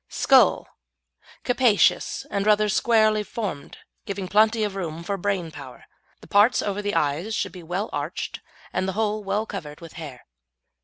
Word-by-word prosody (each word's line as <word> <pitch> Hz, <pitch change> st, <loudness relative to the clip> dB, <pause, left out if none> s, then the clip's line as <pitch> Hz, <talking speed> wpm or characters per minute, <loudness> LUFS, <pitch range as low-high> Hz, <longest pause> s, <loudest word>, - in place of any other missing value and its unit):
SKULL -, -, +4 dB, 0.8 s
Capacious, 245 Hz, -4 st, +2 dB
and 200 Hz, 0 st, -1 dB
rather 210 Hz, 0 st, +4 dB
squarely 215 Hz, 0 st, +3 dB
formed, 205 Hz, -8 st, -6 dB, 0.3 s
giving 195 Hz, -1 st, -4 dB
plenty 215 Hz, +3 st, +3 dB
of 205 Hz, -2 st, -2 dB
room 170 Hz, -4 st, -5 dB
for 200 Hz, +3 st, -2 dB
brain 195 Hz, -3 st, -2 dB
power. 135 Hz, -4 st, -11 dB, 0.4 s
The -, -, -14 dB
parts 210 Hz, +5 st, +4 dB
over 205 Hz, 0 st, -2 dB
the 205 Hz, 0 st, -2 dB
eyes 155 Hz, +9 st, 0 dB
should -, -, -2 dB
be 180 Hz, -, -10 dB
well 180 Hz, +6 st, -3 dB
arched -, -, -4 dB, 0.3 s
and 190 Hz, -, -1 dB
the 190 Hz, -, -2 dB
whole 215 Hz, 0 st, -1 dB
well 205 Hz, +2 st, -1 dB
covered 155 Hz, -9 st, -7 dB
with 165 Hz, -2 st, -11 dB
hair. 135 Hz, -6 st, -9 dB
200 Hz, 160 wpm, -24 LUFS, 175-215 Hz, 0.8 s, SKULL